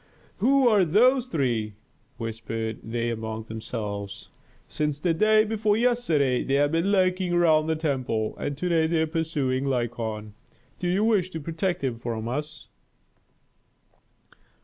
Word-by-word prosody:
"Who 265 Hz, +3 st, +4 dB
are 210 Hz, -5 st, +5 dB
those 245 Hz, -, +4 dB
three?" 120 Hz, -, -1 dB, 0.4 s
whispered 115 Hz, -1 st, -4 dB
they 115 Hz, +1 st, -2 dB
among 110 Hz, -1 st, -4 dB
themselves. 105 Hz, -3 st, -6 dB, 0.4 s
"Since 150 Hz, -2 st, -2 dB
the 165 Hz, +3 st, +1 dB
day 215 Hz, +5 st, +4 dB
before 215 Hz, -1 st, +1 dB
yesterday 220 Hz, -, +2 dB
they 135 Hz, -, 0 dB
have 145 Hz, +1 st, +3 dB
been 165 Hz, +5 st, +1 dB
lurking 185 Hz, -2 st, +2 dB
around 160 Hz, -3 st, +4 dB
the 160 Hz, -, +1 dB
temple, 130 Hz, -8 st, -1 dB
and 145 Hz, -1 st, -3 dB
to 180 Hz, -, -2 dB
day 165 Hz, -2 st, +2 dB
they 160 Hz, -1 st, +1 dB
are -, -, +1 dB
pursuing 155 Hz, -5 st, -1 dB
Lykon. 115 Hz, -5 st, -2 dB, 0.5 s
Do 175 Hz, -1 st, -1 dB
they 185 Hz, -, +1 dB
wish 210 Hz, -5 st, +2 dB
to 160 Hz, -, -6 dB
protect 165 Hz, +2 st, -2 dB
him 125 Hz, -4 st, -2 dB
from 115 Hz, -2 st, -4 dB
us?" 150 Hz, +4 st, -5 dB
150 Hz, 145 wpm, -26 LUFS, 115-180 Hz, 0.5 s, are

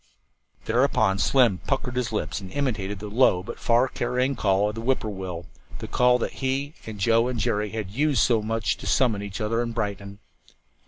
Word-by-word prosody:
Thereupon 110 Hz, -5 st, +2 dB
Slim 95 Hz, -, +3 dB
puckered 135 Hz, -2 st, -1 dB
up -, -, -6 dB
his 125 Hz, -2 st, -1 dB
lips 105 Hz, -1 st, -3 dB
and 95 Hz, -, -8 dB
imitated 110 Hz, -8 st, -2 dB
the 105 Hz, +2 st, -7 dB
low 105 Hz, -4 st, +3 dB
but 120 Hz, -, -8 dB
far 120 Hz, +2 st, +3 dB
carrying 125 Hz, +2 st, -1 dB
call 100 Hz, -2 st, +2 dB
of -, -, -5 dB
the 115 Hz, -, -6 dB
whip 130 Hz, +3 st, +1 dB
poor 110 Hz, -, -4 dB
will 90 Hz, -3 st, -6 dB, 0.3 s
the -, -, -7 dB
call 125 Hz, 0 st, +3 dB
that 120 Hz, -, -3 dB
he 135 Hz, +2 st, -1 dB
and 110 Hz, -2 st, -7 dB
Joe 115 Hz, +4 st, +3 dB
and 125 Hz, -2 st, -3 dB
Jerry 105 Hz, 0 st, 0 dB
had 105 Hz, -3 st, -5 dB
used 145 Hz, +4 st, +2 dB
so 115 Hz, -3 st, +3 dB
much 110 Hz, -2 st, -1 dB
to -, -, -8 dB
summon 115 Hz, -6 st, +2 dB
each 100 Hz, -2 st, -6 dB
other 115 Hz, +2 st, 0 dB
at 115 Hz, -1 st, -4 dB
Brighton. 100 Hz, -2 st, -4 dB
115 Hz, 205 wpm, -25 LUFS, 100-125 Hz, 0.3 s, Slim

